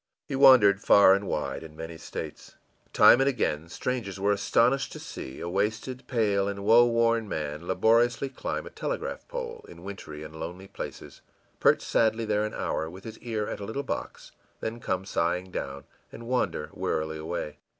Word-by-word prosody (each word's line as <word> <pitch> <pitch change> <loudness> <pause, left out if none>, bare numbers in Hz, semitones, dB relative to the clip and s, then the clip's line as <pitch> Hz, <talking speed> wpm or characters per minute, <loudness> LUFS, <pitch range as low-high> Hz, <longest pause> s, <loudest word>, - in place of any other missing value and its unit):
He - - -3
wandered 110 -7 +7
far 100 -2 +7
and 100 0 0
wide - - -2
and 80 -1 -11
in - - -19
many 80 +1 -7
states. - - -8 0.4
Time 125 - +7
and 135 - +4
again, 85 - -1
strangers 105 -2 -3
were 100 +1 +2
astounded 115 +6 +3
to - - -9
see 65 - -8
a 85 - -5
wasted, 110 +7 -2
pale, 105 -5 +1
and 100 0 -4
woe 115 +3 +6
worn 115 -2 +2
man 75 +1 -4
laboriously 115 +6 +3
climb 130 - -4
a - - -9
telegraph - - -4
pole 485 -1 -6
in 85 - -12
wintry 80 -6 -8
and 75 +1 -10
lonely 90 +4 -7
places, - - -8 0.4
perch - - +4
sadly 115 0 +1
there 105 0 +1
an 110 - -5
hour, 80 - -2
with 95 +3 -11
his 110 -1 -9
ear 110 -3 -3
at - - -5
a 100 - -5
little 125 +7 -3
box, - - -5 0.3
then 115 +1 -4
come 95 -4 -2
sighing 90 0 -1
down, 70 -4 -5 0.3
and 115 - -10
wander 95 -11 -1
wearily 80 0 -2
away. 75 -2 -5
100 Hz, 180 wpm, -27 LUFS, 85-115 Hz, 0.4 s, wandered